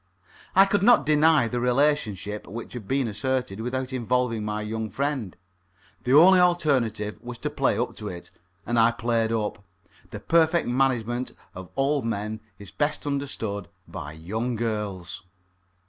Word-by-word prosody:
I 195 +1 +8
could 200 0 +1
not 235 +4 +5
deny 150 -3 +4
the 120 +1 -2
relationship 120 -6 0
which 115 +5 -7
had 115 -5 -7
been 135 -2 +1
asserted, 125 0 -2
without 130 +2 -3
involving 125 -2 0
my 105 0 -3
young 110 +1 -3
friend. 135 -4 -3 0.7
The 125 - +2
only 180 +5 +8
alternative 130 -12 +1
was 120 0 -7
to - - -4
play - - +1
up - - -2
to - - -6
it, 85 -1 -8 0.3
and 120 0 +1
I 115 +1 +6
played 115 -1 0
up. 105 -3 -2 0.5
The - - -7
perfect 165 0 +2
management 125 -1 0 0.2
of 95 -1 -9
old 140 +1 +1
men 110 -1 -3 0.2
is 100 - -11
best 150 0 -1
understood 125 -9 -3 0.2
by 75 +1 -7
young 110 +10 -3
girls. 105 -6 -3
120 Hz, 150 wpm, -25 LUFS, 105-140 Hz, 0.7 s, I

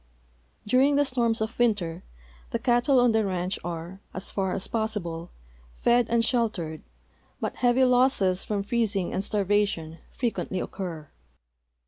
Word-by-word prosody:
During 260 +6 +4
the 290 0 +4
storms 235 -4 +1
of 220 +2 -3
winter 190 -8 +1 0.5
the - - -1
cattle 245 +2 +3
on 245 -1 +5
the 220 0 +2
ranch 185 -1 -2
are, 170 +2 -6 0.2
as 190 - -4
far 190 -2 -1
as 190 - -2
possilde, 195 -7 -3 0.5
fed 240 -1 +3
and 230 0 +3
sheltered, 210 - -1 0.6
but - - -3
heavy 250 +1 +3
losses 250 -7 +3
from 205 -2 -2
freez 225 0 0
ing 185 -3 -1
and 190 - -1
starvation 200 -6 0
frequently 230 -6 -2
occur. 165 -7 -5
210 Hz, 140 wpm, -26 LUFS, 185-240 Hz, 0.6 s, on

